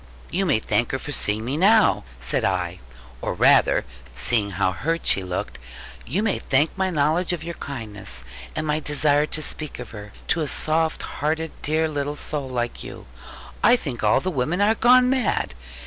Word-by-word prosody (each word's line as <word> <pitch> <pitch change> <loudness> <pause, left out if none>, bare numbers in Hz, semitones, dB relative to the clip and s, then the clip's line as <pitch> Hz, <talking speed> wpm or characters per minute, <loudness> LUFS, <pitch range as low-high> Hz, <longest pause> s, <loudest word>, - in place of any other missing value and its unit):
'You 195 +1 0
may 140 - +4
thank 110 +2 0
her - - +1
for 145 - -7
seeing 110 -4 0
me 135 +4 -2
now,' 215 +5 +4 0.2
said - - +1
I; 90 -1 -1 0.4
'or - - -2
rather,' - - +4 0.3
seeing 105 - +1
how 95 0 0
hurt 165 - -2
she 95 - +4
looked, 90 -8 -4 0.5
'you 180 - -1
may 220 - 0
thank 140 +4 +1
my 190 -1 0
knowledge 165 +3 +1
of 165 -3 -4
your 170 +1 -5
kindness, 110 - -6 0.3
and 155 - -2
my 150 0 0
desire 150 0 +2
to 155 - -4
speak 155 -1 -3
of 125 -3 -8
her 105 -2 -9 0.2
to 170 - +2
a 150 - -1
soft 160 +2 +1
hearted 160 +2 -2
dear 155 +1 +1
little 145 -1 -3
soul 145 -2 -4
like 120 -1 -3
you. - - -9 0.6
I 240 - +7
think 135 - -5
all 105 - +4
the 185 - -2
women 155 +5 -1
are 205 +2 +4
gone 250 +2 +5
mad. 255 - 0
150 Hz, 185 wpm, -23 LUFS, 115-165 Hz, 0.6 s, I